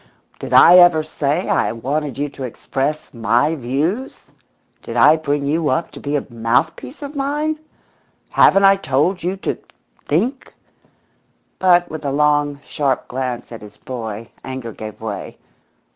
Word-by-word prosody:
"Did -, -, -7 dB
I 180 Hz, -, +8 dB
ever 175 Hz, -3 st, +6 dB
say 155 Hz, +2 st, -2 dB
I -, -, +1 dB
wanted 135 Hz, +4 st, -3 dB
you 145 Hz, +1 st, -1 dB
to 140 Hz, -, -13 dB
express 135 Hz, +4 st, -3 dB
'my 120 Hz, +6 st, +1 dB
views'? 155 Hz, -, -3 dB, 0.5 s
Did -, -, -6 dB
I 155 Hz, -, +7 dB
bring 145 Hz, -2 st, -2 dB
you 155 Hz, +1 st, 0 dB
up 130 Hz, +6 st, -1 dB
to -, -, -10 dB
be 145 Hz, +1 st, -3 dB
a 145 Hz, -, -1 dB
mouthpiece 120 Hz, -, -1 dB
of 285 Hz, +1 st, -7 dB
mine? 295 Hz, +3 st, -1 dB, 0.7 s
Haven't 195 Hz, -, +5 dB
I 195 Hz, 0 st, +6 dB
told 175 Hz, +3 st, 0 dB
you 185 Hz, +3 st, -2 dB
to -, -, -3 dB, 0.5 s
think?" 235 Hz, -, -1 dB, 1.0 s
But 175 Hz, -2 st, +3 dB
with 155 Hz, -1 st, -6 dB
a 140 Hz, -, -1 dB
long, 145 Hz, 0 st, +1 dB
sharp 140 Hz, -3 st, -1 dB
glance 125 Hz, -2 st, -4 dB
at 115 Hz, -, -8 dB
his 105 Hz, -1 st, -13 dB
boy 115 Hz, -3 st, -7 dB
anger 130 Hz, -3 st, -6 dB
gave 110 Hz, 0 st, -9 dB
way. 110 Hz, -2 st, -6 dB
145 Hz, 150 wpm, -19 LUFS, 130-175 Hz, 1.0 s, I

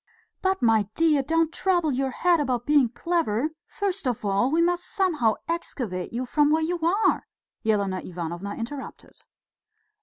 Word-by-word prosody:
"But, 380 Hz, -3 st, 0 dB
my 220 Hz, -3 st, +4 dB
dear, 315 Hz, -3 st, +3 dB
don't 325 Hz, +3 st, +1 dB
trouble 350 Hz, -5 st, +1 dB
your 265 Hz, +1 st, 0 dB
head 345 Hz, +6 st, +2 dB
about 250 Hz, -4 st, -1 dB
being 290 Hz, -5 st, +4 dB
clever; 310 Hz, -3 st, 0 dB, 0.2 s
first 390 Hz, -6 st, -3 dB
of 240 Hz, -4 st, -2 dB
all 200 Hz, +5 st, +2 dB
we 320 Hz, +4 st, +1 dB
must 350 Hz, +1 st, +2 dB
somehow 340 Hz, -, +1 dB
excavate 245 Hz, -, -3 dB
you 245 Hz, +2 st, -3 dB
from 295 Hz, +3 st, +2 dB
where 315 Hz, +1 st, +2 dB
you 345 Hz, +2 st, -1 dB
are," 355 Hz, +7 st, +1 dB, 0.4 s
Elena 200 Hz, -4 st, +1 dB
Ivanovna 175 Hz, +3 st, -5 dB
interrupted. 265 Hz, +4 st, -7 dB
290 Hz, 150 wpm, -25 LUFS, 225-335 Hz, 0.4 s, my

